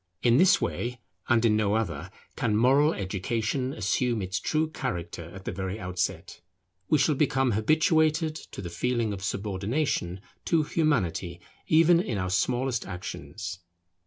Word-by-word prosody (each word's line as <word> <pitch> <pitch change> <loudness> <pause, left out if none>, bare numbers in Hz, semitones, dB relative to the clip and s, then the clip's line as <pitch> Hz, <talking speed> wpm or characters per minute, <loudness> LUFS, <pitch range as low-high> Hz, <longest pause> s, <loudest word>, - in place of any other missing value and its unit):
In 120 0 +5
this 185 +4 +6
way 125 +1 -3 0.3
and 120 -2 +4
in 110 -2 +4
no 105 -1 +2
other, 110 -6 -2 0.3
can 105 -3 +1
moral 135 +6 +4
education 110 - -2
assume 120 +1 0
its 95 -1 -2
true 155 +9 0
character 85 - -5
at 95 +2 -11
the - - -2
very 95 +2 -4
outset. 90 -2 -3 0.5
We 155 - +5
shall 150 +2 +3
become 135 -3 +2
habituated 155 - +2
to 155 - -9
the 85 - -6
feeling 115 +4 0
of 95 -1 -7
subordination 100 - -2 0.2
to 165 -2 +3
Humanity, 100 - 0 0.3
even 165 +2 +5
in 120 - -2
our 90 -1 -2
smallest 125 +4 0
actions. 90 0 -6
115 Hz, 145 wpm, -27 LUFS, 95-145 Hz, 0.5 s, this